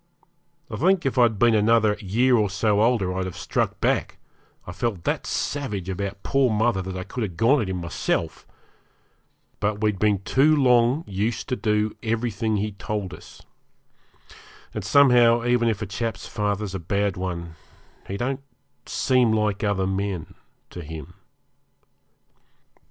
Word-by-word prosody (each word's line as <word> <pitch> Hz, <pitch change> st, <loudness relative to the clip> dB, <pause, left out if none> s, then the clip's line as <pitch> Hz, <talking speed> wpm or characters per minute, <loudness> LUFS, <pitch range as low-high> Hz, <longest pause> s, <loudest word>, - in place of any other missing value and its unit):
I -, -, -6 dB
think 185 Hz, +1 st, +2 dB
if 135 Hz, -1 st, 0 dB
I'd 115 Hz, -3 st, +4 dB
been 120 Hz, +2 st, +4 dB
another 110 Hz, 0 st, +3 dB
year 120 Hz, +6 st, +2 dB
or 105 Hz, -3 st, +2 dB
so 105 Hz, +1 st, +1 dB
older 110 Hz, -6 st, +2 dB
I'd 95 Hz, 0 st, -2 dB
have 95 Hz, -, -6 dB
struck -, -, -2 dB
back -, -, 0 dB, 0.5 s
I -, -, -7 dB
felt 100 Hz, -2 st, -3 dB
that -, -, -2 dB
savage 105 Hz, -11 st, -3 dB
about 100 Hz, +1 st, -4 dB
poor 135 Hz, -2 st, +2 dB
mother 110 Hz, -2 st, +1 dB
that 95 Hz, 0 st, -5 dB
I 90 Hz, -, -4 dB
could 125 Hz, -, -6 dB
have 95 Hz, -7 st, -4 dB
gone 125 Hz, +8 st, +4 dB
at 100 Hz, -, -3 dB
him 95 Hz, -, -2 dB
myself 85 Hz, -1 st, -2 dB, 1.1 s
but 105 Hz, 0 st, -1 dB
we 105 Hz, 0 st, +2 dB
had 95 Hz, -, -10 dB
been 105 Hz, -1 st, +3 dB
too 145 Hz, +8 st, +3 dB
long 125 Hz, +1 st, +3 dB
used 105 Hz, +4 st, -2 dB
to 125 Hz, -, 0 dB
do 105 Hz, -2 st, 0 dB
everything 110 Hz, -1 st, -1 dB
he 105 Hz, +1 st, -2 dB
told 100 Hz, -1 st, -4 dB
us; -, -, -13 dB, 1.3 s
and -, -, -4 dB
somehow, 120 Hz, -4 st, +5 dB
even 120 Hz, -1 st, +2 dB
if 110 Hz, -1 st, -2 dB
a -, -, -2 dB
chap's 105 Hz, +2 st, -4 dB
father's 105 Hz, -2 st, -2 dB
a 95 Hz, -, -3 dB
bad 100 Hz, +3 st, -1 dB
one, 85 Hz, -3 st, -5 dB, 0.5 s
he 100 Hz, -, -4 dB
don't 130 Hz, +4 st, -2 dB, 0.5 s
seem 125 Hz, -3 st, +2 dB
like 105 Hz, -1 st, 0 dB
other 100 Hz, -2 st, +1 dB
men 95 Hz, -2 st, -3 dB, 0.4 s
to 90 Hz, -, -7 dB
him. 80 Hz, -2 st, -9 dB
105 Hz, 155 wpm, -24 LUFS, 95-120 Hz, 1.3 s, somehow